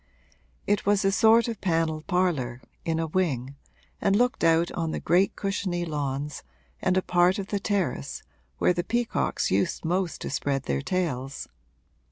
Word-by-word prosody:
It 205 -1 +1
was 205 0 +2
a 195 - +4
sort 225 +4 +5
of 230 -3 -5
panelled 165 -3 0
parlour, 160 -10 0 0.2
in 165 -1 -1
a 165 - 0
wing, 145 -6 -1 0.5
and 200 - +3
looked 245 +3 +1
out 165 +1 +4
on 165 -2 -2
the - - -3
great 180 +3 +2
cushiony 190 -3 -2
lawns 145 -2 -3 0.4
and 185 - +2
a 185 - +2
part 180 +1 +3
of 200 -1 -5
the 205 - -1
terrace 185 - -2 0.3
where 180 - +3
the 175 - -1
peacocks 240 +3 0
used 95 +10 0
most 180 +1 -1
to - - -4
spread 135 -1 -1
their 70 0 -1
tails. 140 - -2
175 Hz, 165 wpm, -26 LUFS, 150-195 Hz, 0.5 s, sort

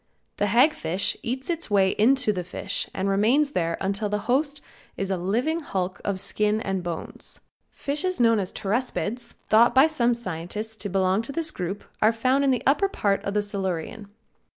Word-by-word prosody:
The 205 - +1
hag 250 +9 +5
fish 195 - -1
eats 260 +3 -4
its 335 -4 -3
way 195 -2 +4
into 240 +2 +3
the 180 -2 -3
fish 185 +2 -4
and 190 +1 -2
remains 235 +10 +3
there 170 - -1
until 200 +2 -1
its 210 -1 -1
host 285 +4 +1 0.4
is 195 0 -2
a - - +2
living 235 - 0
hulk 190 - -3
of 195 -2 -1
skin 210 +2 0
and 195 -3 -2
bones. 170 -2 -7 0.3
Fishes 330 +6 -1
known 230 -2 +4
as 185 -2 -3
Pteraspids, 235 +2 -3
thought 235 +3 +5
by 265 +3 +8
some 245 -7 +1
scientists 210 +1 -5
to 205 - -5
belong 190 +1 +2
to 230 - -6
this 315 +1 -1
group, 185 +3 -4 0.2
are 215 - +5
found 255 +5 +1
in 275 - +3
the 255 -2 +1
upper 345 +9 +3
part 200 - 0
of 200 - -3
the 210 - +2
Silurian. 200 +1 -4
215 Hz, 185 wpm, -25 LUFS, 195-260 Hz, 0.4 s, by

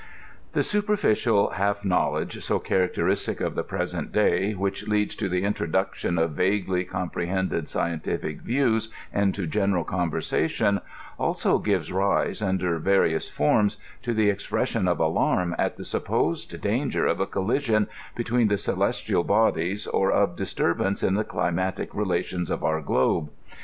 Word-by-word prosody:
The - - +2
superficial 205 - +2
half 100 +1 -1
knowledge, 90 -2 0
so - - +1
characteristic 90 -1 0
of - - -1
the - - -1
present - - -3
day, 100 +3 +2
which 100 +1 -3
leads 105 -1 +1
to 100 -4 -1
the 90 +1 0
introduction 95 -2 -1
of 80 0 +1
vaguely 95 +2 0
com 90 -1 -4
prohended 90 -2 -1
scientific 85 -2 -2
views 115 -3 +1 0.2
into 100 -2 +1
general 100 0 +1
conversation, 90 +4 0 0.4
also - - +1
gives 95 -7 0
rise, 95 +3 +1
under 90 -4 0
various 85 -2 +2
forms, 100 +7 +2 0.2
to 120 -3 -2
the 105 -2 +4
expression 100 0 -1
of - - +1
alarm 90 -1 +1
at - - 0
the - - -7
supposed - - -1
danger - - 0
of - - +1
a - - 0
collision 110 +1 +1 0.3
between 120 0 +1
the 105 -1 +2
celestial 85 - 0
bodies, 100 -2 +1
or 95 0 +1
of 100 -4 +2
disturbance 95 +3 0
in 95 - +2
the 105 +2 +1
climatic 95 -1 -2
relations 90 -3 -1
of - - -2
our 80 0 +1
globe. 70 +1 +1
95 Hz, 140 wpm, -25 LUFS, 90-105 Hz, 0.4 s, the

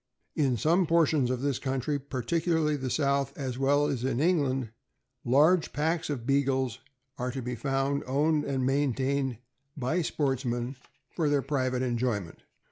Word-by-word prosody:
In 135 -5 +2
some 170 - +2
portions 155 -5 +3
of 130 -1 -1
this 140 -3 0
country, 135 +2 -1
particularly 150 +4 0
the 130 -2 -3
South, 140 0 0
as 130 -3 -4
well 145 +2 +3
as 135 -5 -2
in 130 -2 0
England, 140 -8 +1 0.5
large 150 +8 +3
packs 160 +2 0
of 130 -6 -3
Beagles 130 -3 +1 0.4
are 125 +1 -1
to 130 +1 -4
be 125 +1 -3
found, 135 +3 -1
owned 150 +3 +2
and 135 -2 -1
maintained 135 -1 0 0.4
by 140 +7 0
sportsmen 130 -4 -1 0.4
for 160 -4 0
their 145 -2 +2
private 130 -3 -1
enjoyment. 120 -7 -2
135 Hz, 145 wpm, -28 LUFS, 130-145 Hz, 0.5 s, portions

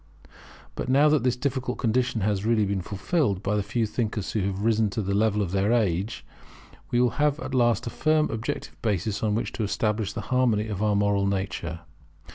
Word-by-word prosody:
But 125 - -4
now 140 +3 +5
that 150 -2 +3
this 125 0 +1
difficult 130 -1 -2
condition 120 -1 0
has 100 0 0
really 110 -1 +2
been 100 -1 -1
fulfilled 100 - -1
by 105 +2 0
the 105 - +1
few 115 +3 -1
thinkers 110 -2 -2
who 110 - -1
have 100 0 -3
risen 110 -1 +2
to 110 +3 -3
the 100 +1 -1
level 105 0 +2
of 90 - -4
their 100 +3 +1
age, 105 -2 0 0.6
we 125 +1 +3
have 145 +4 +1
at 135 - -6
last 120 -2 +2
a 120 - -4
firm 155 +3 +1
objective 115 +1 -5
basis 100 -1 -1
on 105 -2 +1
which 115 - -2
to 115 - -3
establish 105 0 -1
the 110 - -4
harmony 115 -4 +2
of 100 -2 -3
our 105 -1 +2
moral 100 -1 +2
nature. 95 -4 -3
110 Hz, 200 wpm, -26 LUFS, 100-120 Hz, 0.6 s, now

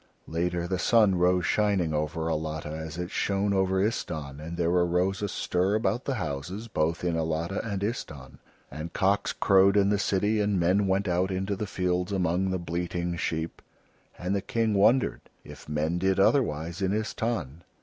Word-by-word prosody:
Later 85 +1 -1
the 95 0 -1
sun 110 -1 +4
rose 90 0 +2
shining 100 -6 +1
over 75 +2 -2
Alatta 80 -1 -3
as 80 +1 -6
it 90 +2 -4
shone 100 0 0
over 95 -1 +2
Istahn, 80 -9 -2
and 85 +2 -7
there 85 -1 +1
arose 90 +2 +1
a 105 - 0
stir 90 +3 0
about 110 +2 0
the 135 - -1
houses 90 - -4
both 85 -5 -1
in 85 -2 0
Alatta 80 +3 -1
and 100 -3 -3
Istahn, 75 - -5 0.3
and 80 +2 -6
cocks 100 +1 +1
crowed 100 +1 +4
in 100 -1 +4
the 100 -1 +2
city 105 +2 +1
and 100 -2 +1
men 95 +4 +2
went 95 +1 +1
out 90 +1 +1
into 95 +2 -2
the 105 +2 -4
fields 90 0 -1
among 95 0 +1
the 95 - 0
bleating 85 0 -3
sheep; 80 -1 -3 0.6
and 90 +2 -2
the 100 - 0
King 115 +2 0
wondered 110 +6 +3 0.2
if - - -12
men 80 +3 0
did 95 +1 +1
otherwise 85 - +1
in 95 0 +1
Istahn. 110 - -2
90 Hz, 175 wpm, -27 LUFS, 85-100 Hz, 0.6 s, sun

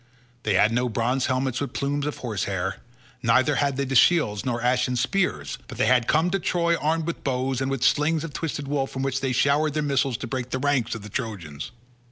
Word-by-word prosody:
They 105 -5 0
had 105 +3 +4
no 125 +1 +1
bronze 120 +3 0
helmets 130 0 -1
with 140 - -3
plumes 145 +1 -1
of 150 - -4
horse 110 -7 -3
hair, 95 -2 -2 0.4
neither 130 +4 +3
had 140 -2 +1
they 140 - 0
shields 125 -7 +4
nor 120 -2 -1
ashen 125 +1 +1
spears, 125 - -1
but - - -9
they - - +2
had 125 0 +3
come 160 +3 +2
to 195 - +1
Troy 170 -1 +1
armed 160 +1 0
with 170 - -4
bows, 130 -1 -1
and 135 - 0
with 135 -2 -2
slings 150 +4 +2
of 165 -3 -6
twisted 145 -3 -4
wool 140 -1 0
from 135 0 -5
which 135 0 -1
they 135 -1 0
showered 145 +4 +2
their 155 - 0
missiles 135 -3 +1
to 130 - -6
break 125 +1 -4
the 130 - -1
ranks 130 -4 0
of 110 - -8
the 105 - -8
Trojans. 95 - -5
130 Hz, 225 wpm, -25 LUFS, 120-145 Hz, 0.4 s, had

